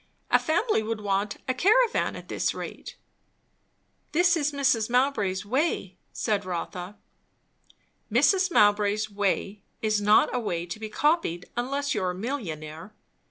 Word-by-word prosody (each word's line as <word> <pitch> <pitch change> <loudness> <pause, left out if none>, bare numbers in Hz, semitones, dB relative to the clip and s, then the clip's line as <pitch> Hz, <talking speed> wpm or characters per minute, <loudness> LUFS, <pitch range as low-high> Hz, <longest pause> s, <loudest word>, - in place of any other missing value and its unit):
A - - +6
family 345 - +1
would 220 0 -4
want 205 +1 -1
a 255 - +1
caravan 440 - +3
at - - -10
this - - -1
rate." - - -7 1.2
"This 350 +2 +4
is 300 -2 0
Mrs. 260 -6 +1
Mowbray's 225 -7 +1
way," 250 - -1 0.2
said 210 -3 -1
Rotha. 180 +1 -5 1.1
"Mrs. 365 - +4
Mowbray's 210 -3 +3
way 200 0 -1 0.2
is 215 -1 0
not 210 +1 +4
a 250 - 0
way 175 -7 -2
to 175 +4 -7
be 220 -1 -6
copied, 295 - 0
unless 275 +4 -1
you 210 - -1
are 185 - 0
a 180 - -3
millionaire. 185 - -6
215 Hz, 140 wpm, -26 LUFS, 195-280 Hz, 1.2 s, A